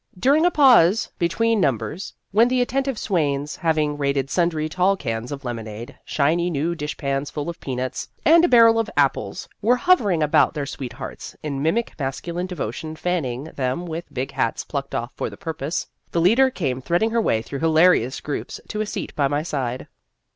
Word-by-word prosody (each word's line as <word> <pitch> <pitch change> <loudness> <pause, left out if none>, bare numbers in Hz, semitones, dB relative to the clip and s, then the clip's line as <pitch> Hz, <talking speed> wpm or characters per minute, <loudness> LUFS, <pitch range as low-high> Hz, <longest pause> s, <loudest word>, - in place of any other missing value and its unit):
During 290 - +4
a - - +5
pause 240 - +5
between 220 +5 +1
num 135 -9 +3
bers, 180 - -7 0.2
when 225 +4 +5
the 255 0 +1
attentive 265 0 0
swains, 145 -7 -1
having 155 -3 0
raided 140 -1 0
sundry 170 -3 +1
tall 185 +4 +1
cans 115 -4 -4
of 140 -1 -6
lemonade, 115 -1 -6
shiny 165 +5 +1
new 165 +1 -1
dish 150 -2 -5
pans 140 0 -2
full 150 +1 -4
of 170 - -14
peanuts, 130 -1 -4 0.2
and 330 +2 +7
a - - +5
bar 240 -6 +7
rel 225 0 +5
of 225 -2 -1
apples, - - 0
were 235 +4 +4
hovering 220 - +3
about 150 - +3
their 145 -2 -2
sweethearts, 135 -2 -7
in 140 -3 -3
mimic 205 +10 0
masculine 170 +6 -3
devotion 155 - -5
fanning 150 -8 -2
them 140 +1 -3
with 170 0 -6
big 130 +1 -3
hats 115 - -1
plucked 140 -2 -4
off 120 +1 -3
for - - -3
the - - -12
purpose, 160 -3 -3 0.2
the 170 - -1
leader 230 +10 +5
came 135 - -2
thread 175 +8 +1
ing 225 - +1
her 230 0 +2
way 110 - +1
through 140 - -6
hilarious 160 -5 +3
groups 145 - -5
to 215 - -2
a 215 - -2
seat - - -5
at 140 -2 +2
my 145 +1 0
side. 130 -6 -3
160 Hz, 190 wpm, -22 LUFS, 140-195 Hz, 0.2 s, and